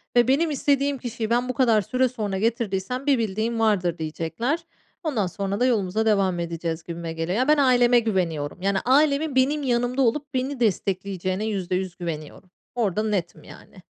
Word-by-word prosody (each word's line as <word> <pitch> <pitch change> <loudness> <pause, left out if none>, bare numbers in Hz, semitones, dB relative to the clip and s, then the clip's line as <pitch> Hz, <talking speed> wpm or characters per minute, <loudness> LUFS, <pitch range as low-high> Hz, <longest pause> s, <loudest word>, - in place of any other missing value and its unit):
ve 240 -1 +5
benim 305 +5 +2
istediğim 280 0 +1
kişiyi 235 -3 -4
ben 245 +2 +1
bu - - 0
kadar 230 -3 +3
süre 255 +5 +1
sonra 210 -6 -3
getirdiysem 230 +3 -1
bir 280 -2 +4
bildiğim 225 +1 -1
vardır, 185 -6 +1
diyecekler. 165 - -2 0.4
Ondan 245 - 0
sonra 195 +3 -3
da 250 - +3
yolumuza 220 -3 +1
devam 195 -5 +2
edeceğiz 165 -1 -3
gibime 170 -1 -6
geliyor. 165 +4 -2
Ya, 255 +3 +1
ben 300 0 +5
aileme 245 -3 +5
güveniyorum. 180 -8 -2
Yani, 195 +1 +1
ailemin 285 +2 +3
benim 285 +3 +2
yanımda 245 +1 0
olup 280 +4 0
beni 260 +1 -2
destekleyeceğine 195 -2 -1
%100 185 -3 -2
güveniyorum. 165 +1 -7 0.3
Orada 215 -3 0
netim 195 -6 -2
yani. - - -14
220 Hz, 165 wpm, -24 LUFS, 185-255 Hz, 0.4 s, ve